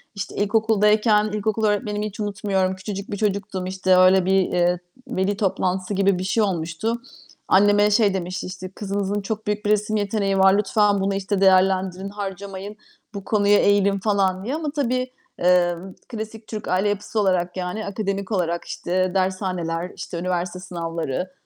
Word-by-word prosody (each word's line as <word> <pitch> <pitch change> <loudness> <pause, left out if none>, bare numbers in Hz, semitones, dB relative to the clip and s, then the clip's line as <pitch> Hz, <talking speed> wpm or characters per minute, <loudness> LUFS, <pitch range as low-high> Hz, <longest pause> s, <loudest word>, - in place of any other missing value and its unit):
İşte, 200 - -5
ilkokuldayken 210 0 +3
ilkokul 215 +1 -1
öğretmenimi 210 0 0
hiç 205 - -10
unutmuyorum. 195 -2 -1
Küçücük 195 +1 -6
bir 205 - -3
çocuktum, 195 -3 -2
işte, 185 0 +2
öyle 185 0 +5
bir, 190 - +2
eee, 175 0 +1 0.3
veli 200 -3 -1
toplantısı 190 -1 -1
gibi 195 -1 +2
bir 185 - -3
şey 215 +3 +1
olmuştu. 185 +5 -2 0.5
Anneme 205 +1 +4
şey 205 -2 +3
demişti, 185 0 -4
işte, 185 0 -7
"Kızınızın 200 0 -2
çok 215 +2 -5
büyük 210 0 -2
bir - - +1
resim 210 +1 +1
yeteneği 200 -1 0
var. 190 0 +6
Lütfen 205 -1 +2
bunu, 195 0 0
işte, 195 0 -1
değerlendirin, 190 0 +3
harcamayın. 200 0 -6 0.4
Bu 200 -1 -6
konuya 205 -1 +3
eğilin." 200 -1 +3
falan 195 -2 +1
diye. 270 +5 -2
Ama 310 -3 -3
tabii, 255 -3 -1 0.3
emm, 180 +1 +2 0.2
klasik 220 -1 -7
Türk 215 -2 -6
aile 185 +3 +1
yapısı 205 +2 -2
olarak, 185 -2 +1
yani, 180 +4 -3
akademik 200 0 -3
olarak, 170 -3 -1
işte, 185 +1 -1
dershaneler, 185 -2 -1
işte, 170 - -6
üniversite 180 0 -2
sınavları, 170 -1 -4
195 Hz, 155 wpm, -23 LUFS, 185-210 Hz, 0.5 s, var